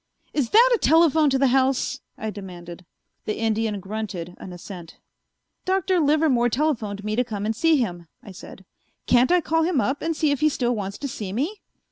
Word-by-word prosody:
"Is 280 Hz, -6 st, 0 dB
that 480 Hz, +3 st, +6 dB
a 470 Hz, -, +2 dB
telephone 320 Hz, -2 st, +4 dB
to 270 Hz, -, +1 dB
the 270 Hz, 0 st, +3 dB
house?" 265 Hz, -1 st, +1 dB, 0.2 s
I 220 Hz, 0 st, -4 dB
demanded. 180 Hz, -3 st, -10 dB, 0.4 s
The 215 Hz, -, -3 dB
Indian 220 Hz, -2 st, -1 dB
grunted 195 Hz, -3 st, -6 dB
an 185 Hz, -, -9 dB
assent. 175 Hz, -1 st, -10 dB, 0.7 s
"Dr. 375 Hz, -1 st, +1 dB
Livermore 290 Hz, -5 st, +2 dB
telephoned 230 Hz, -7 st, -1 dB
me 215 Hz, 0 st, -2 dB
to 250 Hz, -, +2 dB
come 210 Hz, -4 st, -5 dB
and 220 Hz, +1 st, -1 dB
see 325 Hz, +6 st, +3 dB
him," 175 Hz, -9 st, -3 dB, 0.2 s
I 205 Hz, -, -11 dB
said. 190 Hz, +1 st, -12 dB, 0.4 s
"Can't 250 Hz, +5 st, +3 dB
I 360 Hz, 0 st, +4 dB
call 325 Hz, 0 st, 0 dB
him 325 Hz, -3 st, +1 dB
up 265 Hz, +7 st, -1 dB
and 325 Hz, -1 st, -2 dB
see 305 Hz, -2 st, +2 dB
if 285 Hz, -, -1 dB
he 305 Hz, +1 st, +3 dB
still 245 Hz, -4 st, -1 dB
wants 200 Hz, -3 st, -4 dB
to 285 Hz, -, -4 dB
see 210 Hz, -7 st, -6 dB
me?" 300 Hz, -, -3 dB
240 Hz, 195 wpm, -23 LUFS, 205-305 Hz, 0.7 s, that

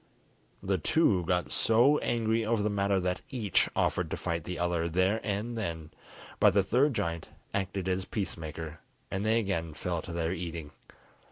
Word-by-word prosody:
The 95 Hz, -1 st, 0 dB
two 95 Hz, -, +3 dB
got 90 Hz, -1 st, 0 dB
so 120 Hz, +7 st, +4 dB
angry 115 Hz, -1 st, +1 dB
over 110 Hz, -1 st, +1 dB
the 105 Hz, -, +1 dB
matter 100 Hz, -1 st, +2 dB
that 90 Hz, 0 st, -1 dB
each 110 Hz, -8 st, +1 dB
offered -, -, +1 dB
to -, -, -3 dB
fight 85 Hz, -1 st, -2 dB
the 90 Hz, -, -4 dB
other 85 Hz, -1 st, 0 dB
there 95 Hz, +6 st, +2 dB
and 105 Hz, +3 st, -2 dB
then, 85 Hz, -8 st, -4 dB, 0.5 s
but 100 Hz, -2 st, +5 dB
the 100 Hz, -, +5 dB
third 130 Hz, +7 st, +2 dB
giant 85 Hz, -5 st, -2 dB, 0.2 s
acted 95 Hz, -1 st, -2 dB
as 95 Hz, 0 st, 0 dB
peace 105 Hz, -4 st, -2 dB
maker, 80 Hz, 0 st, -7 dB, 0.3 s
and 95 Hz, +1 st, -1 dB
they 110 Hz, +2 st, +3 dB
again 85 Hz, -7 st, -2 dB
fell 85 Hz, +2 st, -2 dB
to 85 Hz, -, -8 dB
their 85 Hz, 0 st, -1 dB
eating. 85 Hz, -4 st, -5 dB
95 Hz, 175 wpm, -30 LUFS, 85-110 Hz, 0.5 s, but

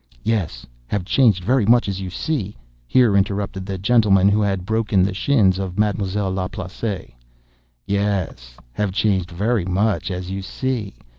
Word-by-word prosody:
"Yes—have 80 Hz, -, -3 dB
changed 105 Hz, -5 st, +3 dB
very 125 Hz, +4 st, +2 dB
much, 120 Hz, 0 st, +4 dB
as 95 Hz, -1 st, -3 dB
you 95 Hz, -, -4 dB
see," 105 Hz, -, -3 dB, 0.3 s
here 120 Hz, -, +4 dB
interrupted 100 Hz, -1 st, -1 dB
the 95 Hz, -1 st, -3 dB
gentleman 100 Hz, -2 st, +4 dB
who 105 Hz, +1 st, +2 dB
had 95 Hz, -3 st, -1 dB
broken 110 Hz, -3 st, +1 dB
the 95 Hz, +1 st, 0 dB
shins 95 Hz, -4 st, +2 dB
of 95 Hz, -2 st, -4 dB
Ma'm'selle 100 Hz, -2 st, 0 dB
Laplace. 95 Hz, -, -4 dB, 0.7 s
"Yes—have 95 Hz, -6 st, -2 dB
changed 95 Hz, -3 st, +1 dB
very 100 Hz, +3 st, 0 dB
much, 100 Hz, +4 st, 0 dB
as 90 Hz, 0 st, -4 dB
you 95 Hz, 0 st, -3 dB
see!" 115 Hz, +1 st, -3 dB
100 Hz, 140 wpm, -21 LUFS, 95-105 Hz, 0.7 s, much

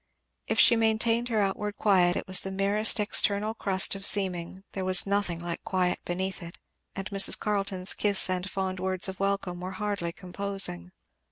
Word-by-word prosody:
If -, -, -1 dB
she 235 Hz, -, +7 dB
maintained 230 Hz, +2 st, 0 dB
her 225 Hz, -, -2 dB
outward 205 Hz, +1 st, -2 dB
quiet 185 Hz, -4 st, +2 dB
it -, -, -4 dB
was 185 Hz, -1 st, +3 dB
the 190 Hz, -, -6 dB
merest 200 Hz, +4 st, +2 dB
external 210 Hz, 0 st, +3 dB
crust 195 Hz, -4 st, +1 dB
of 195 Hz, 0 st, -8 dB
seeming; 185 Hz, -2 st, +2 dB
there 190 Hz, -, -5 dB
was 185 Hz, -1 st, +4 dB
nothing 200 Hz, -3 st, -2 dB
like 170 Hz, 0 st, -7 dB
quiet 185 Hz, -1 st, -1 dB
beneath 185 Hz, +2 st, -4 dB
it; 170 Hz, 0 st, -10 dB, 0.4 s
and 195 Hz, 0 st, -5 dB
Mrs. 195 Hz, -1 st, +3 dB
Carleton's 195 Hz, -3 st, -1 dB
kiss 205 Hz, -2 st, 0 dB
and 185 Hz, +1 st, -3 dB
fond 190 Hz, -1 st, -4 dB
words 185 Hz, 0 st, +1 dB
of 190 Hz, -1 st, -8 dB
welcome 195 Hz, -3 st, -2 dB
were 185 Hz, +1 st, -6 dB
hardly 200 Hz, -5 st, -3 dB
composing. 185 Hz, -, -3 dB
195 Hz, 175 wpm, -26 LUFS, 185-205 Hz, 0.4 s, she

